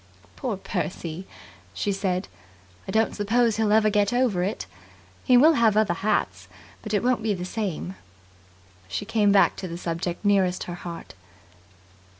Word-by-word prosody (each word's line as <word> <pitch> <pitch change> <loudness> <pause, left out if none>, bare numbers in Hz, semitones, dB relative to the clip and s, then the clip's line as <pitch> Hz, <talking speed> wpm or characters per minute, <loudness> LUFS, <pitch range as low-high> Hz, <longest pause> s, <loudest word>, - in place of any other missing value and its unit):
"Poor 245 -8 -3
Percy!" 175 -1 -4 0.5
she 205 - -1
said. 185 -2 -1 0.6
"I - - -3
don't 220 0 +1
suppose 225 +2 +2
he'll 220 -2 +1
ever 215 0 +4
get 205 -1 +2
over 245 -7 +1
it. 195 +4 -2 0.6
He 250 -2 +5
will 310 +6 +7
have 225 -6 +3
other 215 -5 +3
hats, 95 - -1 0.3
but 215 - -7
it 210 0 +1
won't 250 -2 +2
be 215 -2 0
the 180 -1 -5
same." 185 - -4 0.9
She 205 - -4
came 205 -1 +2
back 200 -1 +4
to 185 - -5
the 170 -1 -6
subject 175 +2 -4
nearest 190 -3 +2
her 175 - -6
heart. 175 -1 -8
205 Hz, 160 wpm, -25 LUFS, 180-220 Hz, 0.9 s, will